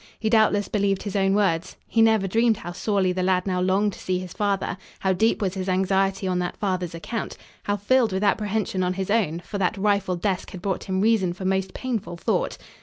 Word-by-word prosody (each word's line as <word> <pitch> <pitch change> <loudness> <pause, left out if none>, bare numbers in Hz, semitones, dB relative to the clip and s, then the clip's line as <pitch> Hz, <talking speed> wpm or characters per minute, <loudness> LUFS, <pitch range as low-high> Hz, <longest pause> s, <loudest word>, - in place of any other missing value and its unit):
He 220 -1 -1
doubtless 215 -2 +3
believed 200 -2 0
his 205 -2 -5
own 195 0 +2
words. 185 -5 0
He 225 - +2
never 220 -3 +4
dreamed 225 +2 +2
how 175 - -7
sorely 190 0 0
the 185 - -2
lad 180 0 +1
now 185 -2 0
longed 195 +2 +2
to - - -11
see 185 -1 -1
his 180 -1 -6
father, 200 -2 -1 0.2
how 190 -1 +2
deep 220 +3 +1
was 185 -2 0
his 190 -1 -3
anxiety 190 +1 +1
on 180 -1 0
that 180 0 -3
father's 185 -4 -2
account, 225 +7 -5 0.3
how 205 0 0
filled 230 +3 +2
with 190 +2 -1
apprehension 205 -1 0
on 180 0 0
his 195 +1 -2
own, 175 -7 +1
for 200 +3 -6
that 195 +3 0
rifled 195 -3 0
desk 195 -2 -1
had 185 - -7
brought 195 -2 -2
him 190 0 -1
reason 210 -5 +2
for 185 +1 -7
most 190 0 0
painful 230 -9 -3
thought. - - -1
195 Hz, 220 wpm, -24 LUFS, 185-210 Hz, 0.3 s, never